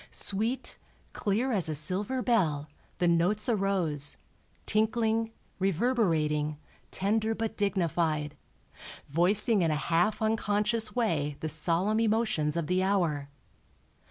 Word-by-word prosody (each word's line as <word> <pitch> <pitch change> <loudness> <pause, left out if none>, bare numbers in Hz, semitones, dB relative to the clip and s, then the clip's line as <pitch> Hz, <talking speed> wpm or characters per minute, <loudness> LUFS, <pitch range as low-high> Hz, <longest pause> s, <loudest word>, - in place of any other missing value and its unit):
Sweet, 225 +6 0 0.3
clear 220 +6 -1
as 190 -8 0
a 155 - -2
silver 195 - -2
bell, 160 - +1 0.3
the 175 - +1
notes 175 +5 +2
arose, 190 - 0 0.5
tinkling, 225 +1 +1 0.3
reverberating, 165 - 0 0.3
tender 220 +3 0
but 220 0 -3
dignified, 165 -6 -1 0.7
voicing 195 - +3
in 165 - +2
a 155 - +1
half 175 +8 +1
unconscious 220 +1 +1
way 150 -12 0
the 160 - -2
solemn 170 +7 +1
emotions 215 -9 0
of 170 - -1
the 180 +4 +1
hour. 170 -8 0
195 Hz, 110 wpm, -29 LUFS, 160-220 Hz, 0.7 s, voicing